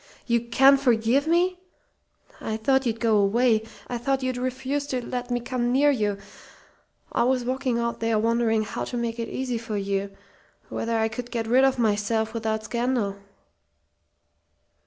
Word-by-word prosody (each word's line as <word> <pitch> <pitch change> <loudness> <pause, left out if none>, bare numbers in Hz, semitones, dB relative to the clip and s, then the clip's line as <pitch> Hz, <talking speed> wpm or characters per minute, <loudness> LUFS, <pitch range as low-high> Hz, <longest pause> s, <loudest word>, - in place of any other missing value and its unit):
"You 235 -1 +2
can 270 +4 +5
forgive 250 +2 +2
me? 355 +2 +2 0.8
I 220 - -3
thought 265 +3 +2
you'd 225 -1 -2
go 225 -2 +3
away. 220 +3 +3 0.3
I 245 - -3
thought 270 +2 0
you'd 255 -1 -1
refuse 260 +3 -2
to 250 -3 -3
let 245 0 -4
me 245 0 0
come 240 0 -2
near 285 +3 +4
you. 210 -6 0 0.9
I - - 0
was 250 0 +1
walking 255 -1 -1
out 235 0 -2
there 225 -1 +1
wondering 225 0 +2
how 210 - -4
to 245 - -5
make 235 0 -3
it 230 - -3
easy 250 -3 -3
for 225 -2 -4
you 200 0 -2 0.6
whether 230 0 -2
I 220 0 +2
could 240 +2 -6
get 230 -2 -2
rid 250 +4 +4
of 270 -1 +3
myself 220 0 0
without 220 -1 -2
scandal." 235 -3 -1
235 Hz, 165 wpm, -25 LUFS, 220-255 Hz, 0.9 s, can